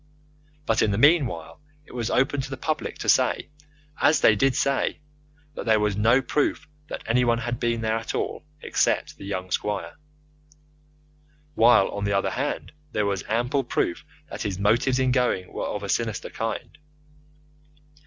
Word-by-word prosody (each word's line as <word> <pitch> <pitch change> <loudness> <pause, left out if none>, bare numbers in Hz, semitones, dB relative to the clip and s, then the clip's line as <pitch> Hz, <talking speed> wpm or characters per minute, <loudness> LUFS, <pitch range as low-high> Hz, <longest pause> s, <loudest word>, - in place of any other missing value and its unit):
But 115 -4 +2
in - - +3
the 100 - 0
meanwhile 120 - +2 0.2
it - - -16
was 120 -2 -2
open 135 +2 +1
to 135 - -7
the 135 - -5
public 155 +2 -3
to - - -6
say - - +2 0.5
as 155 - +5
they 105 - +6
did 135 +4 +2
say 140 +1 +1 0.6
that 125 - -7
there 110 -1 +4
was 105 -1 0
no 115 +6 +3
proof 145 +2 0 0.2
that - - -6
anyone 120 0 +2
had 120 0 -3
been 115 -1 0
there 110 0 0
at 115 - -5
all - - -3 0.2
except - - 0
the - - -10
young 95 -2 -4
squire; 105 +1 -2 1.6
while, 115 -5 +5
on 100 - -5
the 100 0 0
other 100 - +1
hand, 140 +3 -3 0.2
there 105 - 0
was 100 -2 -1
ample 125 +5 +1
proof 90 -7 -1 0.2
that - - -7
his 95 -3 -2
motives 115 +6 +2
in 130 -1 +2
going 125 -8 0
were - - -3
of 105 - -4
a - - -4
sinister 110 -1 -1
kind. 115 +4 -5
115 Hz, 170 wpm, -25 LUFS, 105-130 Hz, 1.6 s, they